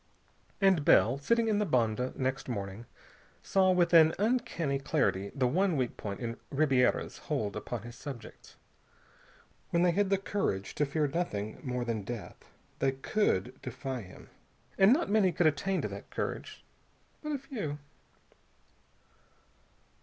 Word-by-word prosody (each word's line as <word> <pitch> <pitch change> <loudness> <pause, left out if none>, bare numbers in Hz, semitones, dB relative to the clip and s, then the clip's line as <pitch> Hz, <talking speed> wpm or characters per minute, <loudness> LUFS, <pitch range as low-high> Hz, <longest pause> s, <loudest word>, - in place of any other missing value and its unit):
And 190 -6 +4
Bell, 130 -1 +5
sitting 230 +9 +2
in 210 -2 +2
the - - +2
bonde 125 - 0
next 130 0 -2
morning, 100 0 -5 0.6
saw 190 -1 +3
with 180 -1 +3
an 160 -1 +7
uncanny 210 - 0
clarity 100 -7 0
the 135 -2 +1
one 175 +6 +2
weak 125 -3 -1
point 100 -2 -5
in 115 -1 -4
Ribiera's 135 -3 +2
hold 105 -2 -2
upon 120 -4 -5
his 120 0 -9
subjects. 130 -6 -9 1.1
When 170 0 +2
they 180 - +4
had 200 +3 +1 0.2
courage 100 - -1
to 150 - 0
fear 150 +2 0
nothing 110 -10 -3
more 125 -2 -3
than 115 -3 -2
death, 105 -4 -8 0.3
they 135 -1 +2
could 135 - 0
defy 130 0 -5
him. 95 -3 -14 0.4
And 195 +3 +6
not 310 +7 +3
many 205 -3 +3
could 170 +1 +1
attain 180 +6 +1
to - - 0
that - - -9
courage. - - -5 0.6
But 300 -1 -3
a - - 0
few.... 235 - -5
140 Hz, 145 wpm, -31 LUFS, 120-190 Hz, 1.1 s, an